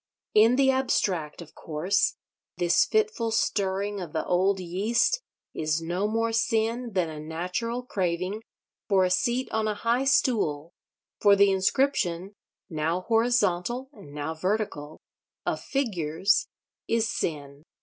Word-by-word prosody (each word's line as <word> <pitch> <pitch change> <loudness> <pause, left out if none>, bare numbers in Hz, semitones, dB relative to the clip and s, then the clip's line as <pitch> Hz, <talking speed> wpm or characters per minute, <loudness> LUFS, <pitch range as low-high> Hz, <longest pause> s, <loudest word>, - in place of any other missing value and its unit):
In 225 +3 +6
the 265 0 +4
abstract, 185 - -1
of 160 - -18
course, 170 +6 0 0.4
this 175 -1 +3
fitful 435 - 0
stirring 200 -2 -1
of 170 -4 -7
the 160 - -2
old 190 +2 +2
yeast 210 - +1 0.3
is 155 0 -1
no 175 +5 -1
more 225 +1 0
sin 230 +1 0
than 180 -3 +1
a 155 -1 -7
natural 180 +10 -3
craving 185 -1 -2 0.5
for 195 -2 +4
a 180 - 0
seat 240 +7 +1
on 220 0 0
a 210 - -1
high 235 +5 0
stool, 175 - +1 0.5
for 205 -1 +6
the 200 0 +5
inscription—now 185 - -1
horizontal, 230 +2 +1
and 145 - -14
now 150 +2 -4
vertical—of 160 -4 -4
figures, 190 - 0 0.4
is 230 0 +1
sin. 145 -6 -4
195 Hz, 125 wpm, -26 LUFS, 170-230 Hz, 0.5 s, In